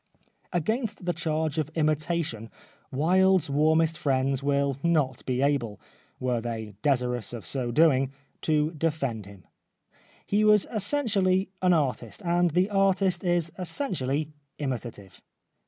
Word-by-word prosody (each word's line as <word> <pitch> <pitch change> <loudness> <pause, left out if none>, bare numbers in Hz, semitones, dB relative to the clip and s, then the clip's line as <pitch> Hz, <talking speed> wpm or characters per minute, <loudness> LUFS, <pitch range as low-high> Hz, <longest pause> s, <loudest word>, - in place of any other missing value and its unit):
Against 210 - -2
the 175 - 0
charge 160 -2 -1
of 155 -1 -1
imitation 155 -6 -1 0.4
Wilde's 180 +2 +3
warm 155 +3 +3
est 165 0 +1
friends 135 -1 +1
will 140 -1 0
not 150 -7 +1
be 130 +1 0
able 120 -8 0 0.2
— - - -35
were 125 -2 -1
they 110 -2 -5
desirous 125 -5 0
of 115 - -7
so 130 -3 -2
doing 135 -1 +3
— - - -42
to 155 0 +1
defend 140 - -2
him. 100 -4 -14 0.8
He 205 +1 +1
was 210 -1 +5
essentially 200 -5 +1
an 180 -1 +4
artist, 150 +5 -1
and 175 0 +2
the 180 +5 +1
artist 195 -2 +2
is 175 -2 +1
essentially 155 - -2 0.3
imitative. 120 -8 -6
155 Hz, 135 wpm, -27 LUFS, 130-175 Hz, 0.8 s, was